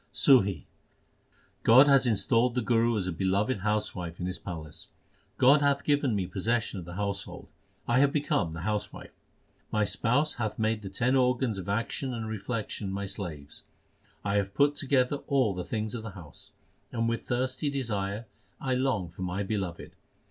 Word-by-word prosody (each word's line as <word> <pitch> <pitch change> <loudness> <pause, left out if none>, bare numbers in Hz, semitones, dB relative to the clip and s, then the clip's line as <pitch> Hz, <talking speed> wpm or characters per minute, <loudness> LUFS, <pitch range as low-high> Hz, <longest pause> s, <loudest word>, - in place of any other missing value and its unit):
SUHI 100 - +4 1.0
God 130 +5 +7
has 135 -2 +5
installed 115 +2 +2
the 125 - 0
Guru 115 0 +2
as 95 - -1
a 90 - -1
beloved 95 +7 0
housewife 95 -5 -2
in 90 - -3
His 90 -1 -3
palace: 80 -5 -7 0.5
God 140 +3 +6
hath 140 -1 +2
given 145 -5 +2
me 95 -2 0
possession 110 +2 -1
of 85 - -8
the 85 +1 -8
household; 100 0 -4 0.4
I 120 +2 +3
have 140 0 +4
become 100 - 0
the 80 - -6
housewife. 105 +3 -4 0.6
My 105 -1 +2
Spouse 130 +9 +1
hath 110 -3 -2
made 110 0 0
the 100 - -6
ten 125 +7 +1
organs 125 -4 +2
of 95 - -6
action 115 +5 -2
and 115 -1 -4
reflec 110 +1 -4
tion 100 -2 -4
my 100 +1 -3
slaves. 85 -8 -6 0.6
1 100 0 +1
have 100 -1 -1
put 145 0 +4
together 140 -1 +1
all 130 -7 +2
the 90 -1 -4
things 110 +3 -3
of 120 - -4
the 110 - -6
house, 80 -5 -11 0.4
And 115 -1 -1
with 115 0 -2
thirsty 130 +4 0
desire 110 -6 -2 0.3
I 130 -2 -1
long 125 -8 0
for 85 +3 -12
my 90 +2 -2
Beloved. 95 -4 -4
110 Hz, 175 wpm, -28 LUFS, 95-125 Hz, 1.0 s, God